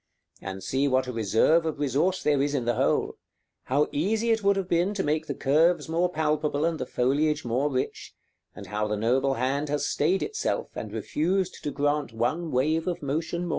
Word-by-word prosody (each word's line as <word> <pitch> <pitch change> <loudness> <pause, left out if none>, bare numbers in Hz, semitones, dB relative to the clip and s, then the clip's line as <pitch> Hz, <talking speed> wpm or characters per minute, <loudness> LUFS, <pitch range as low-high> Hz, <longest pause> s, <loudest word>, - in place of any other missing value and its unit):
And 95 -1 -6
see 135 +8 0
what 130 -1 +2
a 125 - -4
reserve 115 - +3
of 155 - -3
resource 150 +6 0
there 145 -2 +2
is 145 +1 0
in 125 -4 -1
the 120 - +2
whole; - - 0 0.5
how 145 +3 +2
easy 220 +9 0
it 225 -2 +1
would 200 0 +4
have 195 -2 -2
been 180 +4 +1
to 190 - -1
make 155 +2 -1
the - - -3
curves 160 +6 +2
more 170 +2 +1
palpable 150 -2 0
and 165 -2 -1
the 130 - -3
foliage 145 +5 +1
more 125 +5 0
rich, 130 -2 -4 0.4
and - - -9
how 105 0 -2
the 105 0 -1
noble 130 +5 +1
hand 140 +4 -1
has 145 0 0
stayed 175 +6 +1
itself, 430 - -2
and - - -6
refused 185 +4 -1
to - - 0
grant 145 -3 -1
one 130 +9 -1
wave 155 +6 +1
of 175 -4 -3
motion 160 +5 -2
more. - - -4
150 Hz, 205 wpm, -26 LUFS, 130-170 Hz, 0.5 s, would